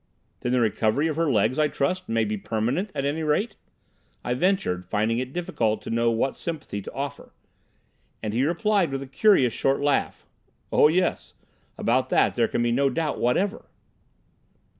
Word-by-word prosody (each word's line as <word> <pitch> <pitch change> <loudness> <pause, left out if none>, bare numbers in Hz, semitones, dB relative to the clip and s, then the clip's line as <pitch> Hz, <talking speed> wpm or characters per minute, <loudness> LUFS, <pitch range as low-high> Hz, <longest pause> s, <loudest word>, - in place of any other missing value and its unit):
"Then 125 - -2
the 125 - +3
recovery 110 +5 +1
of 155 - -2
her 165 -2 +1
legs, 110 +4 +2
I 155 - +4
trust, 150 +6 -2
may 115 -1 +1
be 105 +1 -2
permanent, 120 - -2
at 140 -1 -1
any 145 +3 -1
rate," 160 +9 0 0.7
I 125 - 0
ventured, 125 - 0
finding 110 +3 +1
it 130 0 -4
difficult 115 -10 -1
to - - -6
know 115 0 +2
what 115 +4 0
sympathy 155 -11 -5
to - - -8
offer. 140 0 -6 0.9
And 105 - -2
he 120 +4 +1
replied 195 +3 +1
with 135 0 -3
a - - -10
curious 135 - +3
short 135 0 +1
laugh, 145 0 0 0.5
"Oh - - +6
yes; 175 +3 0 0.4
about - - +1
that - - +3
there - - +2
can 120 - -1
be 120 - +1
no 135 +3 +2
doubt 150 +2 -2
whatever." 195 - 0
135 Hz, 175 wpm, -25 LUFS, 115-160 Hz, 0.9 s, Oh